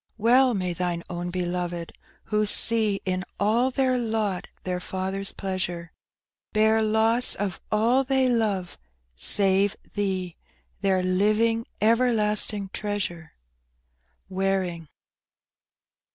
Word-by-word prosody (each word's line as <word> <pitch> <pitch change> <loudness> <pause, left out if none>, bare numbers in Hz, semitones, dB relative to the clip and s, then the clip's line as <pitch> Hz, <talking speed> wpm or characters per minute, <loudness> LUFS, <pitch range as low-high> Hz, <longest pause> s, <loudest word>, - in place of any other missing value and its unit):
Well 245 +3 +4
may 180 -2 -2
Thine 175 -1 -2
own 175 0 -4
beloved, 175 -1 -3 0.3
who 210 0 0
see 215 -2 +3
In 185 0 -1 0.2
all 230 +5 +2
their 260 -1 +1
lot 220 -5 -2 0.2
their 180 -1 -2
Father's 190 +2 -2
pleasure, 180 -3 -4 0.6
Bear 220 +1 +3
loss 220 +3 +3
of 195 -2 -3
all 235 +5 +3
they 265 -1 +2
love, 210 -7 -1 0.4
save 195 - +2 0.2
Thee 190 -4 -2 0.2
— - - -41
Their 190 -2 +2
living, 215 +5 +1 0.2
everlasting 215 -3 +2
treasure. 195 -6 -4 0.9
Waring. 190 -3 -1
200 Hz, 105 wpm, -25 LUFS, 185-225 Hz, 0.9 s, Well